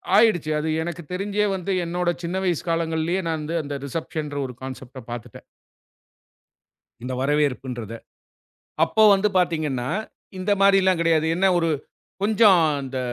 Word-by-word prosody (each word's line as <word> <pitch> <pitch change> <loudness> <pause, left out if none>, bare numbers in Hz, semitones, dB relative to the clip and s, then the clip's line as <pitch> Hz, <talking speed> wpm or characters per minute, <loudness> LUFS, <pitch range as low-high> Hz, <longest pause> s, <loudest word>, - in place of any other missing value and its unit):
ஆயிடுச்சு. 200 -8 +4
அது 155 - -3
எனக்குத் 170 -1 -6
தெரிஞ்சே 205 +2 0
வந்து 190 +1 -4
என்னோட 175 +1 -1
சின்ன 170 +2 -3
வயசு 175 -4 0
காலங்கள்லேயே, 165 +2 0
நான் 160 -1 -1
வந்து 155 +3 -4
அந்த 145 0 -5
ரிசப்ஷன்ற 150 0 -4
ஒரு 125 - -7
கான்செப்ட்ட 130 0 -8
பாத்துட்டேன். 120 -1 -8 1.6
இந்த 125 +1 -4
வரவேற்புன்றத. 130 -5 -1 0.9
அப்போ 220 - +2
வந்து 195 +2 +2
பார்த்தீங்கன்னா, 155 -8 0 0.5
இந்த 185 +2 -1
மாரில்லாம் 195 -2 +4
கிடையாது. 165 -2 +3
என்ன 190 +2 +3
ஒரு, 165 -1 +1 0.5
கொஞ்சம் 205 -4 +5 0.2
இந்த 130 -1 -4
165 Hz, 130 wpm, -23 LUFS, 145-185 Hz, 1.6 s, கொஞ்சம்